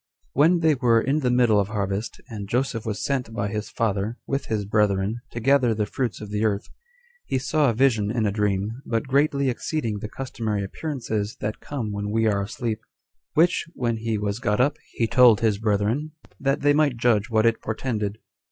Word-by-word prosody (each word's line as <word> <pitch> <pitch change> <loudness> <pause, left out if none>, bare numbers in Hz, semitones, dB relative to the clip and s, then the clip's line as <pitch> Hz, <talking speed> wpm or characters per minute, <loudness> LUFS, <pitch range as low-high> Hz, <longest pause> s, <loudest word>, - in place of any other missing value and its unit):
When 165 +5 +4
they 160 -1 +4
were 120 -4 +3
in 135 +6 +1
the 130 -4 +1
middle 120 -4 +4
of 100 - +1
harvest, 100 +1 -3
and 100 -4 -7
Joseph 120 -2 -1
was 105 -2 -2
sent 130 -5 -1
by 100 -1 -1
his 105 +1 -4
father, 110 +1 -1
with 135 0 -2
his 105 -2 -1
brethren, 105 +1 +1
to 120 - -6
gather 125 -2 +3
the 105 -1 0
fruits 115 -1 -3
of 105 -1 -8
the 105 +1 -1
earth, 105 -2 0 0.6
he - - 0
saw 145 +2 +2
a 115 - -1
vision 115 -5 +3
in 115 0 0
a 100 - +1
dream, 105 +3 -1
but 115 0 -1
greatly 140 +1 +2
exceeding 120 -3 -2
the 105 - -6
customary 110 -5 -3
appearances 110 -3 -3
that 105 +1 -3
come 125 -7 -4
when 100 0 -3
we 110 +1 +1
are 100 -2 +2
asleep; 110 +2 -3 0.5
which, 170 +2 +3
when 120 -2 -1
he 110 -1 -1
was 105 +1 -2
got 105 -3 0
up, 145 +4 +2 0.2
he 115 - +1
told 120 -2 +6
his 110 -3 +2
brethren, 110 +8 0 0.3
that 135 0 0
they 145 0 +4
might 145 -4 +2
judge 115 -2 +2
what 110 -1 +2
it 115 -1 +2
portended. 110 -2 -2
115 Hz, 200 wpm, -24 LUFS, 105-130 Hz, 0.6 s, told